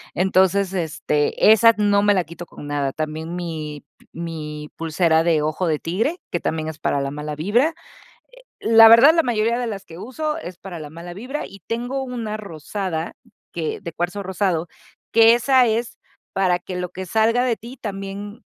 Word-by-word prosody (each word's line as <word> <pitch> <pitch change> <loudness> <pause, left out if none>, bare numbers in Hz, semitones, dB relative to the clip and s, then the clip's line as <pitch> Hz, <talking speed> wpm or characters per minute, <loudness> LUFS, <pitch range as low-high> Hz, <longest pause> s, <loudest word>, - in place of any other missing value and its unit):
Entonces, 190 +1 +2
este, 155 +1 +2
esas 230 +1 +6
no 205 -1 +3
me 205 0 +4
la 185 -3 +1
quito 170 +2 -9
con 145 - -11
nada. 145 -2 -1
También 155 +3 -4
mi 155 -4 -6 0.3
mi 150 -2 -6
pulsera 160 0 +2
de 165 -3 +2
ojo 155 +4 -1
de 155 -2 0
tigre, 225 - -1
que 175 - -2
también 160 -1 -2
es 160 - -6
para 140 - 0
la 140 - -2
mala 150 +1 -5
vibra. 240 - +2 0.9
La 225 0 +8
verdad, 235 +7 +8
la 330 - +4
mayoría 235 -2 0
de 245 - -2
las 200 -4 -5
que 165 +1 -12
uso 300 +8 -3
es 180 - -8
para 185 -3 -8
la 155 -2 -8
mala 170 +3 -9
vibra. 255 +10 -5
Y 195 0 -13
tengo 245 +4 -3
una 235 -5 -4
rosada 175 -2 -4 0.4
que 165 +1 -3
de 170 -4 -6
cuarzo 180 +5 -3
rosado, 185 -3 -1 0.4
que 230 0 +7
esa 255 +1 +4
es 230 +1 -1 0.4
para 185 -2 +2
que 180 +1 -7
lo 180 0 -3
que 185 +2 -7
salga 225 +6 +2
de 240 -3 +1
ti 240 +4 -10
también 200 0 -6
190 Hz, 180 wpm, -22 LUFS, 160-225 Hz, 0.9 s, La